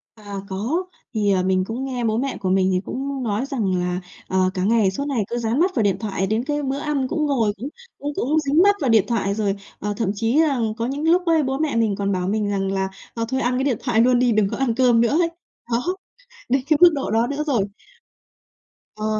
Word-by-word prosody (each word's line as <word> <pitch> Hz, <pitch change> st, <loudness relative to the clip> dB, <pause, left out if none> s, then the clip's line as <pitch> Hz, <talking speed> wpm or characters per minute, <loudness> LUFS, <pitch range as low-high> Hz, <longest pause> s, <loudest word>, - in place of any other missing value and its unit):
À, 205 Hz, -2 st, -9 dB
có, 245 Hz, -, -1 dB, 0.3 s
thì, 205 Hz, -2 st, +1 dB
ờ, 185 Hz, -1 st, +2 dB
mình 185 Hz, 0 st, +2 dB
cũng 240 Hz, +6 st, -4 dB
nghe 250 Hz, -3 st, -3 dB
bố 220 Hz, 0 st, +1 dB
mẹ 270 Hz, +2 st, -2 dB
của 185 Hz, -, -2 dB
mình 190 Hz, 0 st, +3 dB
thì 180 Hz, -, +2 dB
cũng 270 Hz, 0 st, -4 dB
nói 225 Hz, +3 st, -1 dB
rằng 220 Hz, -10 st, -1 dB
là, 180 Hz, +1 st, -2 dB, 0.3 s
ờ, 185 Hz, 0 st, +2 dB
"Cả 185 Hz, -2 st, -2 dB
ngày 215 Hz, -2 st, +3 dB
suốt 280 Hz, +9 st, -4 dB
ngày 255 Hz, -7 st, 0 dB
cứ 240 Hz, -, -2 dB
dán 235 Hz, +2 st, 0 dB
mắt 370 Hz, +2 st, +2 dB
vào 225 Hz, -, +2 dB
điện 200 Hz, -2 st, +2 dB
thoại, 195 Hz, -3 st, -2 dB
đến 220 Hz, +3 st, 0 dB
cái 295 Hz, +1 st, -2 dB
bữa 270 Hz, +1 st, -1 dB
ăn 285 Hz, -3 st, -1 dB
cũng 310 Hz, +1 st, -1 dB
ngồi 235 Hz, -8 st, +1 dB
cũng 255 Hz, +8 st, -5 dB, 0.3 s
cũng 290 Hz, +1 st, -4 dB
cũng 300 Hz, +6 st, +1 dB
dính 300 Hz, +3 st, +2 dB
mắt 405 Hz, 0 st, +5 dB
vào 270 Hz, -, +1 dB
điện 220 Hz, -3 st, +5 dB
thoại." 200 Hz, -4 st, 0 dB
Rồi, 205 Hz, -2 st, 0 dB, 0.2 s
ờ, 210 Hz, +1 st, -2 dB
thậm 210 Hz, -4 st, 0 dB
chí 225 Hz, +7 st, +1 dB
rằng 245 Hz, -8 st, +1 dB
có 230 Hz, -, -1 dB
những 275 Hz, +4 st, -3 dB
lúc 355 Hz, +2 st, +3 dB
ấy 325 Hz, -2 st, +3 dB
bố 265 Hz, 0 st, -1 dB
mẹ 305 Hz, -2 st, -1 dB
mình 225 Hz, -3 st, +2 dB
còn 200 Hz, 0 st, -1 dB
bảo 185 Hz, -1 st, -1 dB
mình 210 Hz, 0 st, 0 dB
rằng 195 Hz, -1 st, -1 dB
là 190 Hz, 0 st, -1 dB, 0.2 s
"Ờ, 230 Hz, -1 st, -2 dB
thôi 265 Hz, +1 st, -1 dB
ăn 250 Hz, +1 st, 0 dB
cái 265 Hz, -, 0 dB
điện 260 Hz, -6 st, +1 dB
thoại 235 Hz, -4 st, +2 dB
luôn 245 Hz, 0 st, +4 dB
đi, 250 Hz, -1 st, +3 dB
đừng 210 Hz, -3 st, +2 dB
có -, -, -4 dB
ăn 260 Hz, -4 st, 0 dB
cơm 245 Hz, -2 st, +4 dB
nữa" 235 Hz, +6 st, +2 dB
ấy. 335 Hz, -, +2 dB, 0.4 s
Đó, 250 Hz, +11 st, 0 dB, 0.5 s
đến 260 Hz, +2 st, +2 dB
cái 310 Hz, -2 st, +4 dB
mức 350 Hz, -, +10 dB
độ 275 Hz, -, -3 dB
đó 225 Hz, +2 st, +2 dB
nữa 285 Hz, +3 st, -2 dB
rồi. 220 Hz, -9 st, 0 dB, 1.3 s
Ờ, 215 Hz, 0 st, -4 dB
235 Hz, 255 wpm, -22 LUFS, 205-275 Hz, 1.3 s, mức